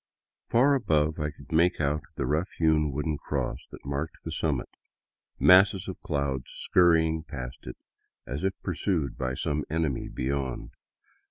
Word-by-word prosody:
Far 135 +5 +5
above 80 - +1
I 75 0 -1
could - - -14
make 85 +3 +3
out 75 0 +1
the - - -1
rough 75 +8 0
hewn 80 -2 +3
wooden 75 +2 -2
cross - - -2
that - - -12
marked 70 +3 -4
the - - -5
summit, - - -1 0.7
masses 95 +1 +6
of 95 - -6
clouds 70 -7 -1
scurrying 80 -3 +3
past 65 -7 -8
it, 60 - -7 0.5
as 70 +6 -5
if 95 0 -1
pursued 90 -5 -1
by 65 0 -2
some 75 +3 -1
enemy 80 -4 -1
beyond. 65 -1 -3
75 Hz, 150 wpm, -28 LUFS, 70-85 Hz, 0.7 s, masses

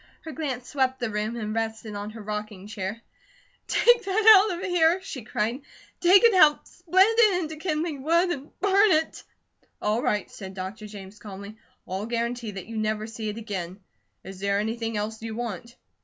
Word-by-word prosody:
Her 320 - -8
glance 260 -4 -4
swept 260 -2 0
the 240 -3 -2
room, 210 +2 -2
and 215 -2 -4
rested 220 -1 -3
on 205 +1 -5
her 220 0 -10
rocking 210 -2 -5
chair. 210 +1 -5 0.7
"Take 480 -1 +4
that 430 +3 +7
out 355 - -3
of 375 - -5
here!" 350 -1 +3
she 310 -9 -6
cried. 225 +4 -2 0.4
"Take 370 +4 +6
it 465 -2 +6
out, 310 -5 +5
split 365 +2 +3
it 395 -6 +4
into 315 0 -6
kindling 310 -3 -2
wood, 340 +5 +2
and 285 -3 -7
burn 400 0 +4
it." 315 +1 0 0.6
"All 215 +3 0
right," 210 -3 0
said 190 -2 -9
Dr. 195 +3 -6
James 200 -1 -11
calmly. 200 0 -9 0.3
"I'll 190 +4 -4
guarantee 235 0 -2
that 195 -3 -7
you 225 0 -7
never 215 0 -1
see 220 -1 -5
it 210 - -6
again. 195 -4 -5 0.4
Is 190 0 -10
there 200 0 0
anything 225 +1 -2
else 215 +1 -4
you 225 -1 -5
want?" 235 0 -6
230 Hz, 185 wpm, -26 LUFS, 210-320 Hz, 0.7 s, that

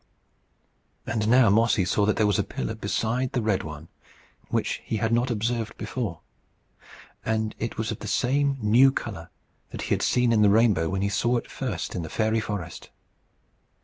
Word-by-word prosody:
And 105 -1 -1
now 120 -2 +5
Mossy 110 -2 +3
saw 100 +3 +1
that 105 - +2
there 110 - +2
was 105 -1 +2
a - - +2
pillar 105 +2 -4
beside 115 +4 -2
the 125 - 0
red 105 -3 +1
one, 75 +1 -8 0.6
which - - -1
he 110 - -2
had 110 +2 0
not 120 +2 +2
observed 115 0 -2
before. 110 - -4 1.0
And 110 -1 -1
it 115 - -4
was 110 +1 -2
of 110 - -5
the 105 - -7
same 135 +4 +1
new 120 +5 +5
colour - - -6 0.4
that - - -6
he - - -6
had - - 0
seen 125 -1 +2
in 110 - +3
the 105 - +6
rainbow 100 -6 +3
when 95 0 -1
he 100 - +1
saw 120 +5 +1
it - - -6
first 115 -10 -4
in 90 - -3
the 80 - -6
fairy 110 +3 +1
forest. 100 -6 -6
110 Hz, 185 wpm, -25 LUFS, 100-120 Hz, 1.0 s, the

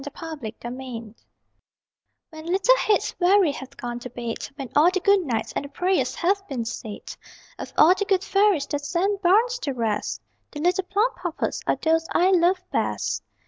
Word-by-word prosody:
THE 290 - -5
PLUMPUPPETS 245 -6 -8 1.0
When 315 0 -10
little 385 +8 +4
heads 425 -4 +1
weary 370 -2 +4
have 270 -2 -10
gone 240 0 -5
to 250 - -8
their 240 -1 -6
bed, 225 - -5
When 275 -4 -7
all 310 +4 +6
the 375 +1 -1
good 400 +2 +4
nights 250 -11 -3
and - - -1
the 280 - -8
prayers 360 +6 0
have 390 +3 +1
been 245 -5 -3
said, 220 -2 -7 0.4
Of - - -7
all 330 +4 +7
the 405 +2 -2
good 385 -1 +1
fairies 400 -7 +2
that 290 -1 -2
send 385 +6 0
bairns 450 +7 +3
to 280 - -3
rest 225 -4 -2 0.3
The 295 - -6
little 360 +4 +1
Plumpuppets 395 -4 -1
are - - +3
those 325 0 +1
I 365 +2 +4
love 360 +1 +3
best. - - -1
330 Hz, 180 wpm, -24 LUFS, 265-385 Hz, 1.0 s, all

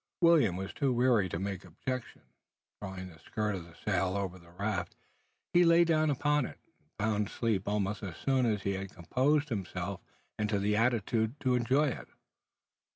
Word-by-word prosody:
William 160 - +5
was 95 +1 -5
too 140 -3 +1
wearied 120 -6 +3
to 85 - -3
make 95 0 -3
objection. 125 - -5 0.6
Drawing 95 -2 -6
the 80 -2 -15
skirt 105 +3 -2
of 90 -4 -5
the 85 -1 -16
sail 95 -1 +1
over 95 -2 -3
the 85 0 -18
raft, 95 +1 -3 0.6
he 175 - +6
lay 170 0 +6
down 155 -2 +2
upon 145 0 +2
it, - - -11 0.2
and - - -37
found 105 -1 0
sleep 110 -5 -1
almost 105 0 -1
as 95 -5 -6
soon 130 -2 +2
is 105 -3 0
he 100 - 0
had 95 0 -4
composed 140 - +1
himself 95 -3 -3 0.4
into 105 -1 +1
the 105 +1 +1
attitude 115 +2 +1
to 130 -2 +2
enjoy 130 +5 +3
it. - - -6
105 Hz, 175 wpm, -31 LUFS, 95-130 Hz, 0.6 s, he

